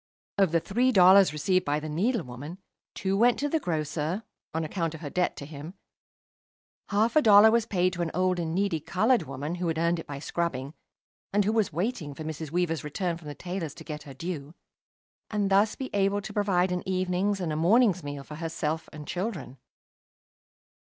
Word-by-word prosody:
Of 195 -5 +4
the 165 - +3
three 245 +10 +1
dollars 190 -3 +7
received 185 +5 +1
by 145 +1 0
the 155 - -6
needlewoman 160 - -2 0.4
two 190 0 -1
went 235 +4 +4
to 290 - -1
the 320 +2 0
grocer, 160 - -2 0.3
on 160 +1 -2
account 165 0 -2
of 160 - -10
her 145 -3 -6
debt 180 0 0
to 140 - -7
him, 155 +4 -9 1.1
half 220 +3 +2
a 310 - +6
dollar 215 -2 +8
was 230 -1 +2
paid 185 -3 +1
to 175 - -3
an 170 - 0
old 185 0 +1
and 165 -1 -2
needy 195 -4 +1
coloured 220 - +2
woman 145 +5 -4
who 175 - 0
had 165 -1 -1
earned 170 +1 +1
it - - -8
by 145 - -6
scrubbing, 140 -2 -3 0.6
and 205 0 +2
who 210 - +2
was 220 -5 +1
waiting 170 - -3
for 155 - -7
Mrs. 155 0 -5
Weaver's 165 -2 -1
return 170 +4 -2
from 165 -2 -11
the 145 - -6
tailor's 175 -5 -5
to - - -10
get 150 -1 -6
her 140 -2 -11
due, 155 0 -6 0.7
and 205 -2 -1
thus 205 +2 +4
be 265 - -6
able 200 0 +2
to 210 +1 -8
provide 190 -3 +1
an 180 0 -1
evening's 185 +2 0
and 170 -4 -2
a - - -2
morning's 190 +3 +4
meal 145 -1 -6
for 150 +2 -9
herself 160 -1 -3
and 150 -1 -9
children. 175 - -4
175 Hz, 200 wpm, -27 LUFS, 155-200 Hz, 1.1 s, dollar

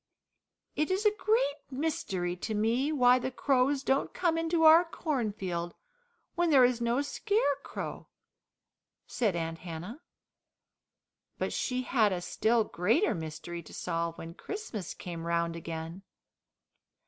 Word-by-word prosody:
"It 305 - 0
is 380 +3 0
a 420 0 +4
great 420 -10 +1
mystery 230 - -2
to 215 +4 -3
me 235 +7 +1
why 250 -3 +5
the 255 - -2
crows 270 +1 +1
don't 270 +1 0
come 340 -3 +1
into 330 0 +1
our 320 +2 +9
cornfield, 210 - -3 0.6
when 345 0 +1
there 270 -5 +7
is 245 -1 0
no 235 +4 +1
scarecrow," 285 - -2 1.0
said 215 -7 0
Aunt 165 -1 -3
Hannah. 180 - -7 1.4
But - - -2
she 255 0 -1
had 225 -5 +2
a 180 - -1
still 225 +5 +2
greater 220 - +1
mystery 165 +1 -6
to 155 - -12
solve 170 -1 -2
when 165 +1 -8
Christmas 230 - -6
came 170 -2 -6
round 170 0 0
again. 165 +2 -6
235 Hz, 130 wpm, -30 LUFS, 175-290 Hz, 1.4 s, our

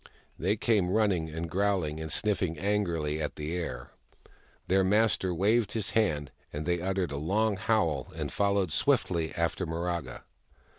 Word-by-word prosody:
They 95 +5 +1
came, 105 -4 +2
running 95 -6 +2
and 80 +2 -4
growling, 90 -4 0
and 80 0 -5
sniffing 95 -6 +1
angrily 85 -6 0
at 75 - -3
the 75 +3 -4
air. 65 -9 -5 0.8
Their 95 +1 +3
master 105 -1 +2
waved 105 +5 +2
his 110 -1 -1
hand, 75 -11 +1 0.2
and 75 +1 -4
they 85 0 0
uttered 95 -2 -1
a 70 - -3
long 105 +8 +1
howl 90 - 0
and - - -3
followed 100 -4 +1
swiftly 80 +2 +1
after 85 +2 -1
Miraga. 85 0 -3
90 Hz, 150 wpm, -29 LUFS, 80-100 Hz, 0.8 s, Their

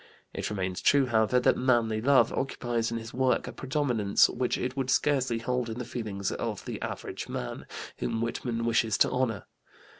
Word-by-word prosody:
It - - -3
remains 95 -3 -3
true, 140 -1 +4
however, 115 0 +3
that 125 - +3
"manly 120 -4 +2
love" 140 +3 +4
occupies 120 -3 -1
in 115 - -2
his 115 0 -8
work 130 0 +1
a - - -4
predominance 130 -7 +2
which 125 0 -1
it 125 +1 -3
would 135 -2 -2
scarcely 130 -3 +2
hold 125 +1 -2
in 110 - -5
the 125 - -4
feelings 105 -5 -3
of - - -4
the - - -5
"average - - -5
man," - - -5 0.3
whom 115 -1 -2
Whitman 115 0 -2
wishes 115 -1 +2
to - - +4
honor. 115 -5 -1
120 Hz, 180 wpm, -28 LUFS, 110-130 Hz, 0.3 s, true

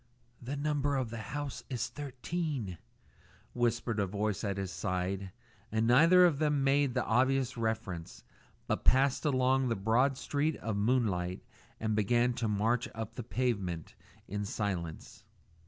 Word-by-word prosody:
"The 130 +4 -4
number 145 -1 0
of 130 -4 -1
the 120 - -5
house 145 -2 -4
is 125 -3 -2
thirteen," 140 - -4 0.7
whispered 120 -2 0
a 100 - +1
voice 105 +1 -2
at 100 -2 -1
his 95 -2 -3
side; 95 +1 -2 0.4
and 110 +1 +1
neither 165 +10 +7
of 155 -5 +2
them 150 -3 +2
made 135 -1 +2
the 125 - +1
obvious 130 +2 +2
reference, 110 -7 -3 0.4
but - - -1
passed 135 +3 +3
across 130 -1 +2
the 115 - +1
broad 120 +7 +2
sheet 145 +3 0
of 110 -2 -3
moonlight 100 -5 0 0.4
and 110 -1 0
began 120 +4 +2
to 115 -1 -2
march 115 +5 +1
up 110 -1 -5
the - - -5
pavement 100 -9 -2 0.3
in 105 +1 -3
silence. 95 -6 -4
120 Hz, 145 wpm, -32 LUFS, 100-135 Hz, 0.7 s, neither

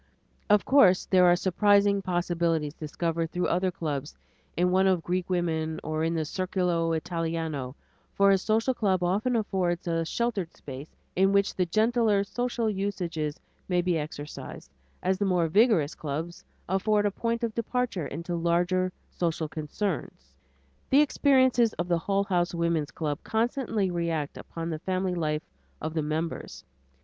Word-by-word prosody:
Of 210 0 +4
course 195 -10 +5
there 185 -1 +4
are 175 - +6
surprising 200 +2 +3
possibilities 170 -4 0
discovered 165 +1 -2
through 180 +1 -1
other 180 +2 +1
clubs, 150 -4 -4 0.4
in 180 +1 +2
one 190 +1 +4
of 185 -3 +2
Greek 180 0 -2
women 160 -3 -1
or 155 +1 -2
in 165 +1 0
the 160 -1 -1
"circolo 175 -2 0
Italiano," 160 -5 -3 0.4
for 200 0 +5
a 195 - +4
social 225 +6 +1
club 190 -6 +1
often 210 +8 +1
affords 185 -6 -1
a 165 -1 +1
sheltered 200 -1 -2
space 135 +2 -9 0.2
in 195 +2 +4
which 200 0 +2
the 180 -1 0
gentler 220 +1 +2
social 240 +2 -2
usages 180 -7 -2 0.3
may 180 -1 +2
be 175 0 +1
exercised, 150 - -6 0.3
as 190 +1 +1
the 205 - +1
more 180 -3 +2
vigorous 190 - +3
clubs 160 +3 -5 0.2
afford 205 +3 +2
a 205 - +2
point 230 +3 -2
of 230 -2 -1
departure 230 - -2
into 170 +3 -4
larger 175 +2 +1 0.2
social 165 -2 -1
concerns. 150 - -4 0.6
The 275 +2 +6
experiences 260 -5 +3
of 175 - -3
the 170 -1 +1
Hull 195 +4 0
House 175 -3 0
Woman's 170 -3 0
Club 150 -3 -3
constantly 225 -4 0
react 165 -4 -2
upon 165 0 -6
the 155 - -3
family 185 +1 -1
life 155 -3 -1 0.4
of 155 0 -4
the 160 - 0
members. 155 +2 -4
180 Hz, 155 wpm, -27 LUFS, 165-200 Hz, 0.6 s, are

